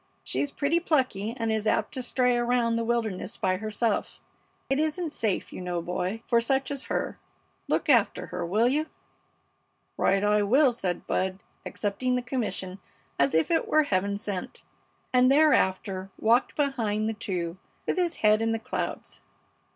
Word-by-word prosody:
She's 285 - -1
pretty 290 +4 +1
plucky 255 - 0
and 225 -2 -1
is 220 0 -1
apt - - +1
to 260 - -3
stray 250 0 +2
around 240 -1 +1
the 230 - 0
wilderness 225 -5 -2
by 185 -1 +1
herself. 215 +1 -1 0.5
It 270 - +2
isn't 315 +1 -1
safe, 215 -4 -2
you - - -6
know, 180 -1 -2
boy, 180 +6 -3
for 235 -1 +3
such 265 +3 0
as 280 -1 -4
her. - - -3 0.5
Look - - 0
after 240 -8 +3
her, 180 0 -5
will 210 +8 +2
you?" 300 +5 +1 1.1
"Right 195 +1 +2
I 210 0 +3
will," 255 +6 +4
said 180 -6 -3
Bud, 190 +1 -1 0.2
accepting 250 +5 -1
the 250 - -1
commission 205 -7 -3 0.4
as 140 +2 +3
if 160 - +2
it 325 - +2
were 310 0 +4
Heaven 200 -5 0
sent, 200 -3 -5 0.5
and 255 +1 +5
thereafter 195 -10 +2
walked 235 +3 +2
behind 225 -7 0
the 225 - -1
two 180 -4 -4 0.3
with - - -1
his 350 -2 +1
head 215 +1 +5
in 225 0 +1
the - - 0
clouds. 225 - -5
225 Hz, 165 wpm, -27 LUFS, 195-260 Hz, 1.1 s, and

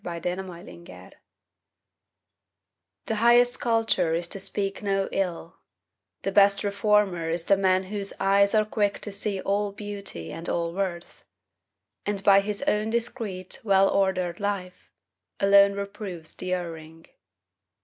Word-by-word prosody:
TRUE 170 -1 -5
CULTURE 180 -1 -7 1.9
The 225 - -1
highest 240 +2 +4
culture 225 -8 +1
is 170 +1 -2
to 195 - -4
speak 195 0 -3
no 195 -1 0
ill, 175 -3 -3 0.7
The 195 - -1
best 200 0 +4
reformer 200 -4 +1
is 165 0 0
the 195 - +5
man 190 -1 +2
whose 200 +1 -3
eyes 200 +1 +3
Are 215 0 +3
quick 205 -2 0
to 205 - -5
see 200 0 -2
all 200 +1 -1
beauty 200 - -6
and 165 +2 -3
all 170 -1 -1
worth; 180 -2 -4 0.8
And 200 -1 -2
by 195 0 +6
his 205 +4 -2
own 215 -6 0
discreet, 225 -5 -3
well 195 -2 +4
ordered 185 -3 0
life, 200 -3 -4 0.5
Alone 200 0 +6
reproves 200 -5 -5
the 185 - -5
erring. 165 -2 -8
195 Hz, 130 wpm, -26 LUFS, 180-205 Hz, 1.9 s, by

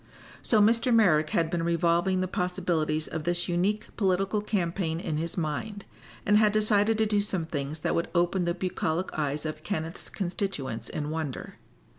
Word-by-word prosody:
So 220 - +3
Mr. 230 +4 +4
Merrick 165 -10 +4
had 165 0 +1
been 175 - 0
revolving 170 +2 +2
the 185 - 0
possibilities 175 -4 -1
of 160 -1 -4
this 175 +1 0
unique 190 +5 -1
political 195 +1 +1
campaign 175 -5 -1
in 155 -3 -2
his 165 +3 -3
mind, 190 +6 -3 0.4
and 210 +1 +5
had 215 -1 +4
decided 215 0 +3
to 220 - +3
do 210 -1 +2
some 190 -5 -1
things 150 0 -4
that - - 0
would 170 - -1
open 175 +1 +2
the 170 0 0
bucolic 180 -1 -2
eyes 150 0 -2
of 155 0 -4
Kenneth's 165 -1 -4
constituents 150 - -3
in 150 0 -3
wonder. 155 -5 -5
175 Hz, 170 wpm, -28 LUFS, 160-200 Hz, 0.4 s, and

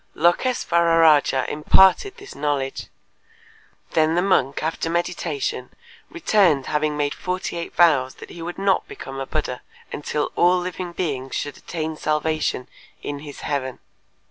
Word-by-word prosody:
Lôkês'vararâja 165 - +3
imparted 190 - +4
this 400 0 -11
knowledge. 140 -2 -2 1.0
Then 160 0 +2
the 175 - +2
monk 140 -9 +1
after 160 +1 -2
meditation 165 -6 -2 0.4
returned 200 - +2
having 150 0 0
made 145 -1 0
forty 185 0 -4
eight 170 0 -5
vows 140 -7 +4
that - - -11
he 170 - -9
would 175 +1 -5
not 195 -1 +1
become 135 0 -8
a 135 - -4
Buddha, 135 -5 -3 0.3
until 150 0 -2
all 180 +1 +4
living 180 0 -4
beings 140 -7 -3
should 145 -1 -3
attain 160 -2 -5
salvation 155 -4 -1 0.4
in 145 -1 -4
his 145 -1 -10
heaven. 130 -3 -2
155 Hz, 135 wpm, -22 LUFS, 145-175 Hz, 1.0 s, imparted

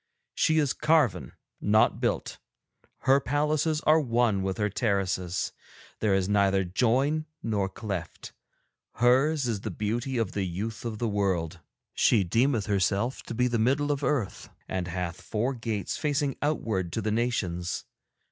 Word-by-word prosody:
She 160 - +2
is 145 -4 +2
carven, 155 -8 +2 0.3
not 110 +1 +3
built; - - -1 0.6
her 135 +1 +4
palaces 150 +3 0
are 155 +1 +5
one 115 -6 +1
with 95 0 -2
her 105 -1 +1
terraces, 95 -4 -1 0.5
there 105 -3 +2
is 95 -1 +1
neither 100 -1 +3
join 130 - +1 0.2
nor 100 -4 0
cleft. 95 -5 -6 0.6
Hers 135 +5 +3
is 110 -4 -2
the - - -4
beauty 120 +5 -2
of 115 -5 0
the 100 - -2
youth 105 +7 -5
of 115 -2 -3
the 115 - -1
world. 95 -5 -1 0.3
She 105 -4 +3
deemeth 115 +4 +1
herself 100 +4 0
to 115 - -7
be 125 +2 +2
the 120 -2 0
middle 140 +6 +2
of 145 0 -2
Earth, 125 -11 -1 0.2
and 95 -2 -3
hath 90 -1 -4
four 120 +5 -1
gates 115 -6 -3
facing 145 -3 0
outward 110 - -1
to 115 - -1
the 110 - 0
Nations. 105 -7 -1
110 Hz, 150 wpm, -27 LUFS, 95-135 Hz, 0.6 s, are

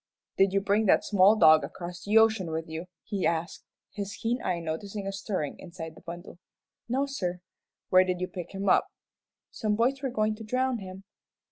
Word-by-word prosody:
"Did 195 0 +4
you 195 0 +1
bring 205 +2 +2
that - - +4
small 200 +1 +5
dog 155 -5 +6
across 175 0 -7
the 210 +2 +3
ocean 220 -5 +4
with 160 0 -3
you?" 160 +2 -6 0.2
he 200 -3 -3
asked, 170 +1 -2 0.3
his 200 -1 -5
keen 240 +2 -2
eye 180 -2 -1
noting 195 +5 -5
a 195 - -2
stirring 195 -6 -4
inside 170 -3 -8
the - - -16
bundle. 175 +1 -9 0.5
"No, 265 +4 +1
sir." 180 -11 -3 0.5
"Where 185 0 +6
did 180 -1 -2
you 185 - -2
pick 180 0 -8
him 195 +1 -3
up?" - - +4 0.6
"Some 215 -2 -1
boys 255 +5 +1
were 270 - -1
goin' 215 -2 0
to 225 - -8
drown 255 +2 0
him." 190 0 -9
195 Hz, 195 wpm, -28 LUFS, 175-215 Hz, 0.6 s, dog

